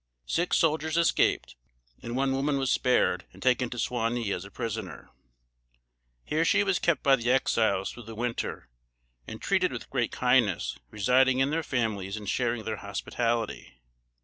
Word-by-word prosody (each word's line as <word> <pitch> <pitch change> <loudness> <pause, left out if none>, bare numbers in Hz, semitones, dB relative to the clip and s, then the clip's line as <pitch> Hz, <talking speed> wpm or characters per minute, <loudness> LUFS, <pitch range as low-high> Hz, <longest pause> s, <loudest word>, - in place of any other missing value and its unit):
Six 175 +2 +1
soldiers 160 0 +1
escaped, 170 - +2 0.5
and 120 +1 -5
one 135 +1 +1
woman 140 +2 0
was 135 -2 0
spared 125 -1 +2
and - - -15
taken 125 -1 +2
to 120 - -7
Suwanee 115 -2 -1
as 90 - -4
a 100 - -10
prisoner. 110 -5 -6 1.1
Here 155 +2 0
she 205 - +3
was 195 -2 +1
kept 170 -2 +1
by 135 -1 +6
the 120 -2 -2
Exiles 110 -6 +2
through 120 - -11
the 115 - -7
winter, 120 - -3 0.6
and - - -7
treated - - +1
with - - -7
great - - 0
kindness, - - +2
residing 125 +5 +3
in 135 +2 +2
their 165 +1 0
families 110 -8 -2
and 105 -1 -8
sharing 115 0 0
their 110 -1 -3
hospitality. 105 - -3
120 Hz, 160 wpm, -28 LUFS, 110-135 Hz, 1.1 s, by